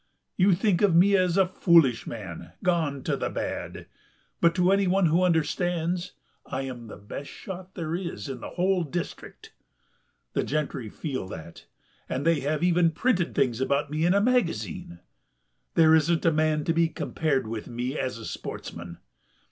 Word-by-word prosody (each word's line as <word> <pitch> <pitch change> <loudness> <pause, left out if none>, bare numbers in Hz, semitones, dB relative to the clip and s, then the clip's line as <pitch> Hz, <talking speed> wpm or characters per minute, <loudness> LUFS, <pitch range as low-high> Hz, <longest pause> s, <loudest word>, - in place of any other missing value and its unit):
You 190 +1 +4
think 195 0 +1
of 200 -5 +4
me 195 +4 +6
as 185 -1 +2
a 195 - +5
foolish 165 -9 +4
man, 85 -7 -7
gone 160 -6 0
to - - 0
the - - -2
bad, - - -4 0.5
but 170 -1 +3
to 180 0 +3
anyone 195 -1 +3
who 165 +2 +3
understands 175 0 0 0.3
I 135 0 -4
am 125 -3 -7
the - - -9
best 105 +8 -8
shot 190 -1 -9
there 165 -3 -3
is 175 -3 -5
in 135 -2 -5
the - - -6
whole 185 0 +1
district. 165 +3 -6 0.8
The - - +1
gentry 140 -6 -2
feel 130 -4 -4
that, 80 -2 -10 0.4
and 135 +3 -2
they 165 -2 +3
have 150 +3 -1
even 175 -1 +4
printed 180 +1 0
things 125 -2 +1
about 140 +2 0
me 155 +1 -1
in 175 +3 +4
a 200 - +4
magazine. 140 - -1 0.7
There 160 -1 +6
isn't 160 +2 +3
a 165 - +5
man 155 -1 +1
to 165 - +1
be 165 0 +3
compared 150 -4 -1
with 110 -1 -5
me 125 +3 -3
as 130 -2 -2
a 115 - -8
sportsman.... 85 0 -7
160 Hz, 170 wpm, -26 LUFS, 130-180 Hz, 0.8 s, me